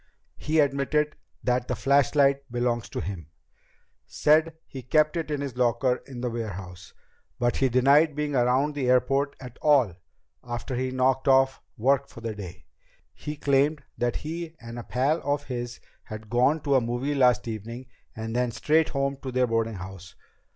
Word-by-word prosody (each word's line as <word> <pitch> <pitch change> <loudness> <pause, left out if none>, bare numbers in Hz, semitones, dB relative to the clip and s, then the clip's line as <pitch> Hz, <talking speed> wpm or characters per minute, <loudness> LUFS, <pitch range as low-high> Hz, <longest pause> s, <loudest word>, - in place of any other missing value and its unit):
He 155 +2 -1
admitted 145 +1 +1 0.3
that 125 0 0
the - - -1
flashlight 140 -1 +2
belongs 120 -1 -1
to - - -4
him; 90 -6 -6 0.8
said 155 +2 +3
he 135 - -8
kept 155 +5 +2
it 165 -2 -3
in 145 -2 -2
his 140 -4 -5
locker 125 +1 +2
in 130 -3 -8
the 125 - -1
warehouse. 95 -5 -7 0.4
But 120 0 0
he 135 - +2
denied 140 +5 +4
being 150 -1 -2
around 130 +4 +2
the 135 -3 -1
airport 135 +3 +2
at 125 -3 -11
all 135 - +4 0.5
after 120 +1 -5
he 130 +1 -1
knocked 130 +2 +1
off 135 0 +4 0.2
work 135 +4 +2
for 115 - -12
the 115 -1 -3
day. 95 -5 -9 0.5
He 150 - -6
claimed 140 +1 +2
that 120 -1 -1
he 165 +1 -5
and 115 0 -8
a - - -6
pal 135 +8 0
of 145 +1 -1
his 120 -3 -5 0.3
had 110 0 -9
gone 130 +6 +3
to 140 - 0
a 130 - +5
movie 120 +5 -2
last 125 -5 +3
evening 115 +3 -6 0.3
and 110 +1 -5
then 125 0 +1
straight 155 +7 +2
home 140 0 -1
to 130 - -5
their 125 0 +2
boardinghouse. 95 -6 -4
130 Hz, 170 wpm, -26 LUFS, 120-140 Hz, 0.8 s, a